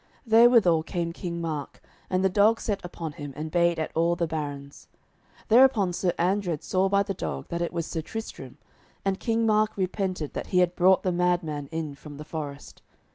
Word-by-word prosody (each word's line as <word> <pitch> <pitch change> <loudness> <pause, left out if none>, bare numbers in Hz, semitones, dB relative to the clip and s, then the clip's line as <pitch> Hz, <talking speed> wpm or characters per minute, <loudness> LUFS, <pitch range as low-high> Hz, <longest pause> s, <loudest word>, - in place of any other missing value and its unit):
Therewithal 225 -7 +5
came 170 +1 -3
King 170 -1 -5
Mark, 155 -4 -4 0.3
and 185 0 +1
the - - +6
dog 210 +4 +3
set 205 -2 -3
upon 170 -2 -6
him 145 -1 -8
and 155 +1 -5
bayed 170 0 +2
at 155 - -3
all 170 +1 +2
the 170 -1 0
barons. 145 -3 -6 0.6
Thereupon 225 -6 +5
Sir 175 0 0
Andred 180 -3 0
saw 190 +1 +1
by 200 0 +3
the 200 0 -3
dog 70 - -5
that 170 - -3
it 170 - -1
was 170 -2 -3
Sir 160 - -4
Tristram, 225 +7 -8 0.5
and 195 -1 0
King 230 -1 0
Mark 215 -1 +2
repented 185 -4 -2
that - - -5
he 185 - -1
had 180 -1 +3
brought 185 +1 +4
the 185 - +1
mad 180 0 +1
man 145 -3 -5
in 160 -3 -4
from 145 +1 -11
the 150 - -8
forest. 145 -3 -7
175 Hz, 195 wpm, -26 LUFS, 160-195 Hz, 0.6 s, the